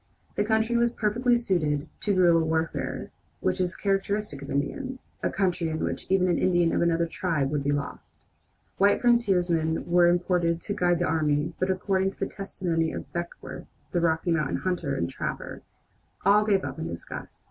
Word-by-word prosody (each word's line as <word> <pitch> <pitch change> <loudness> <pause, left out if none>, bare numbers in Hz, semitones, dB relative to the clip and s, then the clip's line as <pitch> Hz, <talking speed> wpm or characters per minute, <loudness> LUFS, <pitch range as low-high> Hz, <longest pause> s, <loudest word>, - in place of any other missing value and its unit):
The 205 - +1
country 220 +2 +1
was 235 0 +3
perfectly 240 +2 +2
suited 160 -9 0
to 210 - -1
the 195 - +1
guerilla 170 -2 +5
warfare 160 0 -2 0.3
which 95 - 0
is 180 0 -1
characteristic 200 -5 -1
of 140 - -8
Indians 260 - -3
a - - +1
country 180 -4 0
in 155 - -2
which - - -3
even 185 -1 +3
an 175 - +2
Indian 175 -2 +3
of - - +1
another 170 0 +2
tribe 160 -5 -1
would 145 -2 -1
be 145 - +1
lost! 145 0 -5 0.5
White 200 +1 +4
frontiersmen 180 -9 +2
were 175 0 +5
imported 175 -1 +2
to 205 - -3
guide 175 -4 +2
the 175 - 0
army, 155 0 +1
but 185 - 0
according 190 0 +1
to - - -13
the - - 0
testimony 170 -4 -2
of - - -7
Beckworth, 170 0 -6 0.2
the 175 - +1
Rocky 165 +1 +1
Mountain 155 -4 +1
hunter 175 -6 -1
and 85 - -1
trapper, - - -5 0.6
all 205 +1 +6
gave 200 -3 +2
up - - -5
in 160 - -3
disgust. 85 - -8
175 Hz, 180 wpm, -27 LUFS, 160-195 Hz, 0.6 s, all